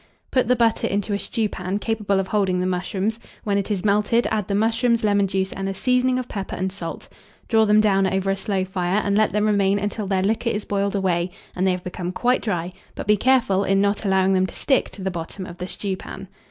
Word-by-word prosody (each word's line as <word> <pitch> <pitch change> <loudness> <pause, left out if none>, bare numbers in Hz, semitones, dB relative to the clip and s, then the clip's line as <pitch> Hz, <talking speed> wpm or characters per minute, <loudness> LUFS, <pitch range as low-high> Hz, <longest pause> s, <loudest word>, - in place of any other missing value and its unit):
Put 255 -3 +2
the 250 - +4
butter 230 -2 +2
into 205 +1 -1
a 200 - 0
stewpan 200 -5 -2
capable 210 -2 0
of 190 -1 -3
holding 190 -3 +1
the 180 - 0
mushrooms; 190 +4 -2 0.2
when 200 -2 +1
it 200 - -4
is 205 -2 -2
melted, 210 +3 +2
add 215 -3 -1
the 200 - -1
mushrooms, 230 +2 +2
lemon 205 -1 +3
juice, 190 0 -1
and 195 0 -3
a 195 - -4
seasoning 250 +3 +2
of 255 -1 -3
pepper 195 -2 -5
and 190 +1 -2
salt; 180 -4 -7 0.4
draw 220 -2 +4
them 210 0 +5
down 195 -2 +3
over 190 +1 0
a - - +1
slow 195 -1 -1
fire, 185 +1 0
and 200 0 +1
let 215 0 +3
them 210 0 +1
remain 200 -2 +2
until 205 0 -3
their 190 -1 +1
liquor 220 +4 0
is 210 -2 -2
boiled 200 0 -1
away, 180 -2 0 0.3
and 185 +1 +1
they - - +4
have 180 0 -3
become 180 0 -4
quite 250 +6 +1
dry, 180 -4 -2 0.2
but - - -5
be 210 +1 +4
careful 225 -4 +2
in 195 0 +2
not 200 +1 +1
allowing 190 -1 +2
them 185 0 +2
to - - -9
stick 265 -3 +1
to 195 - -10
the 190 - -1
bottom 175 +2 -6
of 175 0 -10
the 180 - -4
stewpan. 195 0 -5
200 Hz, 235 wpm, -22 LUFS, 190-215 Hz, 0.4 s, them